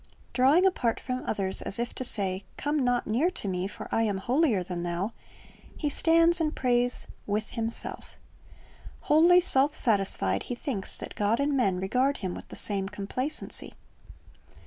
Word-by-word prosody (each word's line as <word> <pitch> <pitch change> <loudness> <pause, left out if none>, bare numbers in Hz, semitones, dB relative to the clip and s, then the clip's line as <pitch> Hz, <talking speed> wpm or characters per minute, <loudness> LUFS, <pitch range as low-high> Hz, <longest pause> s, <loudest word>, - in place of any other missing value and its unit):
Drawing 280 +9 +4
apart 245 -12 +1
from 255 0 -4
others 190 -2 -1
as 195 - -3
if 235 +1 -3
to - - -4
say, 195 -5 -1
"Come 290 -1 0
not 245 -1 +1
near 255 +11 +1
to 290 - -5
me; 185 0 -1
for 200 - -9
I 225 - +2
am 210 -3 0
holier 240 - +1
than 175 -1 -5
thou,"^ 175 +5 -2 0.7
he 295 -2 -1
stands 335 +2 +4
and 310 -1 0
prays 245 -1 +2 0.2
"with 210 +1 -2
himself" 230 -1 -5 0.9
Wholly 345 +4 +5
self 285 -3 +2
satisfied, 195 - +2
he 245 - -2
thinks 240 -7 -3
that - - -7
God 210 +3 +1
and 285 0 +1
men 195 -9 +1
regard 255 +9 +1
him 185 -3 -4
with - - -9
the - - -10
same 195 -2 -2
complacency. 230 +9 -3
240 Hz, 165 wpm, -28 LUFS, 195-285 Hz, 0.9 s, Wholly